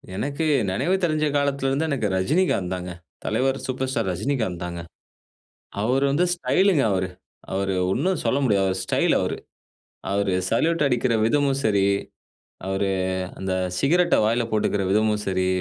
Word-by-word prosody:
எனக்கு 140 +10 -2 0.3
நெனைவு 175 - +1
தெரிஞ்ச 155 -2 +1
காலத்தில 140 -1 0
இருந்து 140 +4 0
எனக்கு 135 -7 0
ரஜினிகாந்த் 100 - +1
தாங்க. 90 -1 -5 0.3
தலைவர் 130 +4 +1
சூப்பர் 130 0 -2
ஸ்டார் 130 - -1
ரஜினிகாந்த் 100 -3 -2
தாங்க. 85 -1 -5 1.0
அவரு 130 +5 +1
வந்து 150 +6 +2
ஸ்டைல்ங்க 180 -2 +2
அவரு. 95 -1 0 0.4
அவரு 95 0 -1 0.2
ஒண்ணும் 185 - 0
சொல்ல 135 - +2
முடியாது. 100 -5 +2
அவரு 95 - -1
ஸ்டைல் - - +2
அவரு. - - -2 0.8
அவரு 100 -1 +1 0.2
சல்யூட் 165 -1 +1
அடிக்கிற 125 -2 +1
விதமும் 140 +2 +2
சரி, 100 -3 +3 0.8
அவரு 95 +1 0 0.5
அந்த 95 0 -3 0.3
சிகரெட்டை 175 - +3
வாயில 115 +2 +1
போட்டுக்குற 105 -2 +1
விதமும் 105 +1 +2
சரி, 95 -1 0
120 Hz, 140 wpm, -23 LUFS, 95-140 Hz, 1.0 s, சரி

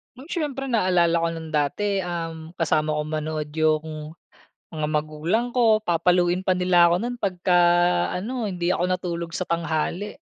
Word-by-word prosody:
Oh, 260 - -12
siyempre 275 -6 -3
naalala 180 -6 +3
ko 165 - +1
nung 160 -1 -7
dati, 195 +7 0
um, 165 -2 -5
kasama 155 -2 +1
ko 150 - 0
manood 155 0 -3
yung 155 0 -1 0.6
mga 155 -2 -2
magulang 155 +10 -1
ko. 230 -3 +4
Papaluin 175 +1 +2
pa 185 -1 +1
nila 180 -1 +4
ako - - +3
nun 240 +4 -3
pagka 180 -2 +1 0.5
ano, 220 +5 -3
hindi 180 -1 -1
ako - - -2
natulog 170 -2 -3
sa 180 - -3
tanghali. 170 - -2
175 Hz, 150 wpm, -24 LUFS, 160-190 Hz, 0.6 s, ko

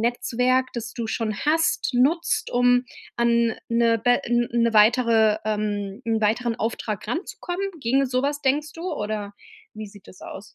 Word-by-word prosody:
Netzwerk, 250 +2 +1
das 225 -2 -6
du 235 -2 -4
schon 220 -2 -2
hast, 320 0 +1
nutzt, 300 +8 +1
um 245 0 +3 0.3
an 235 -1 +2
'ne 230 -1 +2
be 245 0 +2
n 240 0 +1
'ne 235 -1 +2
weitere 220 -1 +4
ähm, 210 -1 -3
'n 225 -1 0
weiteren 230 +2 0
Auftrag 215 -2 -4
ranzukommen, 355 - -4 0.2
ginge 270 +3 +1
so 255 0 -1
was 290 +1 -1
denkst 290 +3 0
du, 345 +3 -5
oder 210 -1 -4 0.4
wie 215 0 -7
sieht 200 -1 -16
das 185 - -15
aus? 200 - -10
235 Hz, 160 wpm, -23 LUFS, 215-255 Hz, 0.4 s, weitere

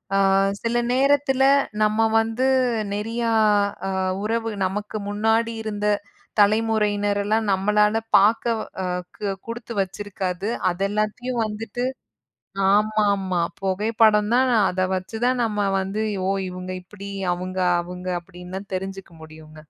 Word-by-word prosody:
ஆ, - - +4 0.5
சில 235 +1 0 0.2
நேரத்துல 270 0 +3 0.4
நம்ம 215 +1 +2 0.2
வந்து 225 +3 0 0.5
நெறியா 230 +3 -2 0.6
அ - - -1 0.3
உறவு 225 +1 -1 0.2
நமக்கு 210 +3 -3
முன்னாடி 225 +2 +1
இருந்த 210 -1 -3 0.5
தலைமுறையினர் 205 -1 +2
எல்லாம் 220 +2 +1
நம்மளால 210 +3 +2 0.2
பாக்கக்வ் 225 +2 +3
வா 190 - -7
அ 180 0 -2 0.2
கு 210 - -5 0.2
குடுத்து 230 0 -6
வச்சிருக்காது. 195 0 -4 0.2
அத 175 +1 -4
எல்லாத்தையும் 225 +3 -1
வந்துட்டு 225 +3 -4 0.9
ஆமாமா 200 -4 +2 0.2
பொகைப்படம் 210 +2 +2
தான், 260 +1 +4
நா 235 - +4
அத 185 0 0
வச்சு 185 +4 -4
தான் 250 -1 +1
நம்ம 210 -2 0
வந்து, 195 +3 -3 0.3
ஓ! - - +2 0.2
இவங்க 180 0 -7
இப்டி, 200 +1 -10 0.2
அவுங்க 185 +1 -4 0.2
அவுங்க 180 +1 -7
அப்டின்லா 180 +1 -9
தெரிஞ்சுக்க 190 -1 -5
முடியூங்க. 155 0 -13
210 Hz, 120 wpm, -23 LUFS, 190-225 Hz, 0.9 s, ஆ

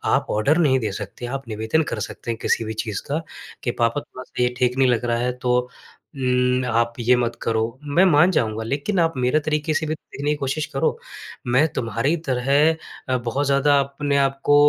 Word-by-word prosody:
आप - - 0
ऑर्डर 125 +10 +2
नहीं 135 -6 +3
दे 110 -4 -2
सकते, 105 +4 -6
आप 135 0 -5
निवेदन 110 +9 0
कर 110 - -3
सकते 115 - -6
हैं 115 - -4
किसी 115 - +1
भी 110 - -4
चीज़ 105 -2 -3
का 155 +3 -1 0.4
कि 120 - 0
पापा 115 +3 0
थोड़ा-सा 130 -3 -5
ये 125 0 +1
ठीक 125 +1 +1
नहीं 135 -1 +4
लग 120 0 +1
रहा 120 0 +1
है 125 +1 0
तो 125 0 +3 0.6
उम, 125 -1 +1
आप 115 0 +1
ये 125 +2 +4
मत 120 -1 -1
करो, 110 -1 0 0.2
मैं 150 +6 +3
मान 175 +2 +5
जाऊँगा। 110 -7 0
लेकिन 145 - -1
आप 165 -1 +2
मेरे 125 +5 +2
तरीके 150 0 0
से 155 - 0
भी 155 - -1
देखने 145 -1 -5
की - - +1
कोशिश 145 +2 -2
करो। 135 - +1 0.5
मैं 130 +6 +4
तुम्हारी 115 +7 0
तरह 125 +1 -1 0.6
अ, 130 - +2
बहुत 125 +4 -2
ज़्यादा 140 +1 +4
अपने 140 +1 -1
आप 135 0 +1
को 145 - +5
130 Hz, 210 wpm, -22 LUFS, 120-145 Hz, 0.6 s, मान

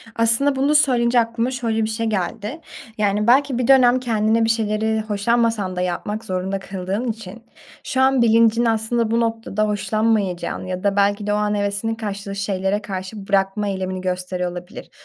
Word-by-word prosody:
Aslında 230 +5 +3
bunu 280 +3 +2
söyleyince 245 -4 +4
aklıma 230 +2 -1
şöyle 230 -4 -1
bir 215 - -1
şey 225 +1 -2
geldi. 215 - -3 0.4
Yani, 210 +1 +1
belki 265 +1 +4
bir 245 -1 -1
dönem 255 -2 +5
kendini 225 -1 +1
bir 225 - 0
şeyleri 220 0 0
hoşlanmasan 215 -2 0
da 180 - -2
yapmak 205 +5 -3
zorunda 190 0 -2
kıldığın 195 +5 -4
için 220 0 -10 0.4
şu 260 - -1
an 265 -1 +4
bilincin 230 0 +4
aslında 225 0 0
bu 230 - +2
noktada 225 -2 -1
hoşlanmayacağını 210 -4 -1
ya 185 0 -4
da 200 -1 +1
belki 205 +1 +1
de 205 - +1
o - - +2
an 210 0 0
hevesinin 205 +2 -1
kaçtığı 200 -2 -5
şeylere 195 0 -1
karşı 195 0 -7
bırakma 200 +1 +1
eylemini 185 -1 -3
gösteriyor 180 -1 -3
olabilir. 175 0 -9
215 Hz, 170 wpm, -21 LUFS, 195-230 Hz, 0.4 s, dönem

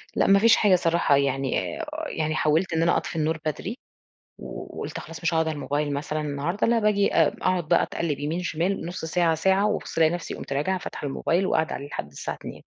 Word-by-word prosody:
لأ - - +3
ما 195 0 +6
فيش 225 +2 +6
حاجة 200 -4 +4
صراحة، 170 -4 +2
يعني 135 - -1
أ - - -4 0.2
يعني 155 - -2
حاولت 160 +4 +1
إن 160 - +1
أنا 170 +1 +3
أطفي - - -4
النور 160 0 0
بدري 185 - -3 0.6
و - - -8
وقُلت - - -5
خلاص 165 +1 -10
مش 165 0 +1
هاقعد 160 0 +2
على 160 - -2
الموبايل 145 0 -2
مثلًا 150 +2 -2
النهاردة، 150 +6 -1
لأ 235 0 +3
باجي 210 -2 +2
أ 160 -3 +5
أقعد 180 -4 0
بقى - - +4
أتقلّب 155 -5 -2
يمين، 160 +5 -2
شمال، 175 +2 -1
نص 175 -1 -5
ساعة، 165 0 +2
ساعة، 190 +5 +2
وأبُص 210 - -3
ألاقي 160 -1 +5
نفسي 175 0 -4
قُمت - - -7
راجعة 150 +7 0
فاتحة 155 - -6
الموبايل، 170 +6 0
وقاعدة 160 -3 +1
عليه 140 - -6
لحد 80 - -5
الساعة 70 - -5
02:00. - - -10
165 Hz, 215 wpm, -25 LUFS, 150-185 Hz, 0.6 s, ما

